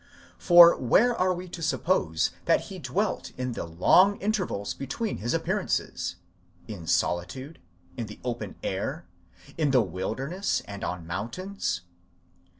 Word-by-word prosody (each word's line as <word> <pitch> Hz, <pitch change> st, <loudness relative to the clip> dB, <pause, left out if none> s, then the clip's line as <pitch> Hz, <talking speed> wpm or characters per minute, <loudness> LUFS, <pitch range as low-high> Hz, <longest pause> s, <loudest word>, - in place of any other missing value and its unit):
For 175 Hz, -1 st, +8 dB
where 220 Hz, -, +3 dB
are 185 Hz, -2 st, +2 dB
we 180 Hz, 0 st, -4 dB
to 170 Hz, -, -8 dB
suppose 150 Hz, -, +1 dB
that -, -, +4 dB
he -, -, -9 dB
dwelt -, -, -2 dB
in 125 Hz, 0 st, -2 dB
the 115 Hz, -, -4 dB
long 175 Hz, -, +4 dB
in 205 Hz, +3 st, +1 dB
tervals 180 Hz, -, -2 dB
between 195 Hz, -, -3 dB
his 120 Hz, +3 st, -3 dB
appearances? 90 Hz, -, -1 dB, 0.5 s
in 90 Hz, -7 st, -8 dB
solitude? 110 Hz, -, -1 dB, 0.4 s
in 115 Hz, -, -3 dB
the 105 Hz, -, -11 dB
open 120 Hz, -1 st, -4 dB
air? -, -, -3 dB, 0.5 s
in 150 Hz, -2 st, +2 dB
the 130 Hz, -3 st, +4 dB
wilderness 115 Hz, -, -2 dB
and 100 Hz, -1 st, -8 dB
on 90 Hz, -2 st, -4 dB
mountains? 115 Hz, -, -3 dB
130 Hz, 140 wpm, -27 LUFS, -, 0.5 s, For